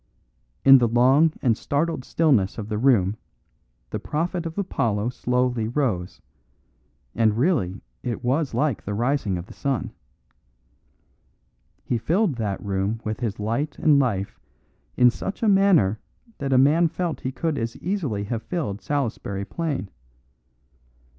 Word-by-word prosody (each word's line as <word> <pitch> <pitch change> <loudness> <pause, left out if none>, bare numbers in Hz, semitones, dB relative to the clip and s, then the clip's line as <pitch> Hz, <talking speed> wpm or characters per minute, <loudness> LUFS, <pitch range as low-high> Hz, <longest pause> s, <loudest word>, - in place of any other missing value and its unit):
In 135 -1 +9
the 120 - +3
long 130 +7 +4
and 120 -4 +3
startled 145 +2 -1
stillness 130 - +2
of 110 -2 -6
the 105 -1 -2
room 110 -6 +3 0.7
the - - -3
prophet 170 +2 -2
of 165 - -9
Apollo 115 - -1
slowly 125 -2 0
rose; 115 -9 -2 0.9
and 110 -2 +2
really 120 - +1 0.2
it 120 0 -4
was 135 +4 0
like 145 -6 0
the 100 - -4
rising 120 -4 0
of 85 - -6
the - - -13
sun. 135 -7 -2 1.9
He 120 - -1
filled 175 - +1
that 105 -3 -3
room 100 +3 -1
with 110 0 -3
his 110 -5 -3
light 115 +8 -2
and 150 -2 +4
life 100 -8 -1 0.6
in 125 -1 +6
such 195 - -6
a - - +3
manner 195 - +4 0.4
that 140 -1 -2
a 130 - +4
man 150 +6 +5
felt 165 +1 -3
he 130 - -3
could 160 +2 -2
as 115 0 -4
easily 155 - -2
have 115 +2 -3
filled 115 - -4
Salisbury 115 -8 -2
Plain. 150 - -3
125 Hz, 140 wpm, -24 LUFS, 110-155 Hz, 1.9 s, In